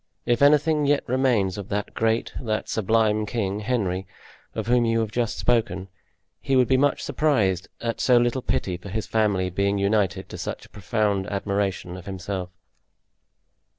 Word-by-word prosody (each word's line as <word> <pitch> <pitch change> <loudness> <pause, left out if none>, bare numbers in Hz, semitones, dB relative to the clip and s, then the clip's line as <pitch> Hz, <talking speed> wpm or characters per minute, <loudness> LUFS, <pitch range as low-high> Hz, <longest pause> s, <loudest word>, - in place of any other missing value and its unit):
If 120 +1 +1
anything 150 +1 +4
yet 145 0 +2
remains 120 -7 +1
of 100 - -8
that 105 0 -3
great, 115 +1 0
that 110 -4 -2
sublime 110 0 +1
king, 105 -3 -2
Henry, 100 -5 -1 0.5
of - - -2
whom 120 0 +3
you 115 0 +2
have 110 -2 -3
just 120 0 -1
spoken, 110 -6 0 0.5
he 135 - 0
would 125 -1 +4
be 130 - +3
much 140 +2 +2
surprised 100 - +1
at 115 -2 -2
so 125 -2 +5
little 120 +2 +1
pity 90 -6 -1
for 95 +3 -10
his 110 +2 -3
family 100 -4 +1
being 100 +2 +1
united 100 -2 +1
to - - -8
such - - -5
a - - -19
profound 100 0 -1
admiration 100 -3 -2
of 90 +2 -11
himself." 95 -1 -4
110 Hz, 165 wpm, -24 LUFS, 100-120 Hz, 0.5 s, so